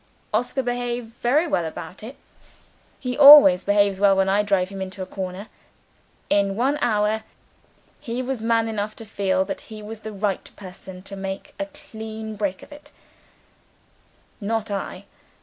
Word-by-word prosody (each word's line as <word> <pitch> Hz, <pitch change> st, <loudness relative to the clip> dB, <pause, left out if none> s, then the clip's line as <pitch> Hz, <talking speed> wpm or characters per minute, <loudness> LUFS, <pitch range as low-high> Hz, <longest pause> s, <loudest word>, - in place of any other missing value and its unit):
Oscar 245 Hz, +4 st, 0 dB
behaved 245 Hz, -1 st, -3 dB
very 285 Hz, +8 st, +2 dB
well 295 Hz, -, 0 dB
about 165 Hz, +2 st, -7 dB
it 235 Hz, +6 st, -9 dB, 0.8 s
he 250 Hz, -2 st, -3 dB
always 280 Hz, -11 st, +9 dB
behaves 200 Hz, -1 st, +2 dB
well 195 Hz, -1 st, +4 dB
when 195 Hz, 0 st, +2 dB
I 200 Hz, +2 st, +3 dB
drive 195 Hz, -3 st, +1 dB
him 195 Hz, -1 st, -7 dB
into 190 Hz, 0 st, -5 dB
a -, -, -6 dB
corner! 190 Hz, +2 st, -6 dB, 0.8 s
In 200 Hz, -1 st, +2 dB
one 270 Hz, +6 st, +1 dB
word, 215 Hz, -1 st, +1 dB, 0.8 s
he 240 Hz, +2 st, -4 dB
was 260 Hz, -2 st, -3 dB
man 225 Hz, 0 st, +2 dB
enough 215 Hz, -1 st, -3 dB
to 225 Hz, -, -10 dB
feel 190 Hz, -3 st, 0 dB
that -, -, -5 dB
he 215 Hz, -1 st, -9 dB
was 220 Hz, +1 st, -8 dB
the 220 Hz, 0 st, -7 dB
right 200 Hz, -2 st, -2 dB
person 185 Hz, -1 st, -11 dB
to 200 Hz, -, -9 dB
make 195 Hz, 0 st, -6 dB
a 295 Hz, -, -2 dB
clean 220 Hz, -6 st, -8 dB
breast 195 Hz, -2 st, -3 dB
of -, -, -15 dB
it 290 Hz, 0 st, -13 dB, 1.5 s
not 220 Hz, 0 st, -2 dB
I. 200 Hz, -1 st, -5 dB
210 Hz, 160 wpm, -23 LUFS, 195-235 Hz, 1.5 s, always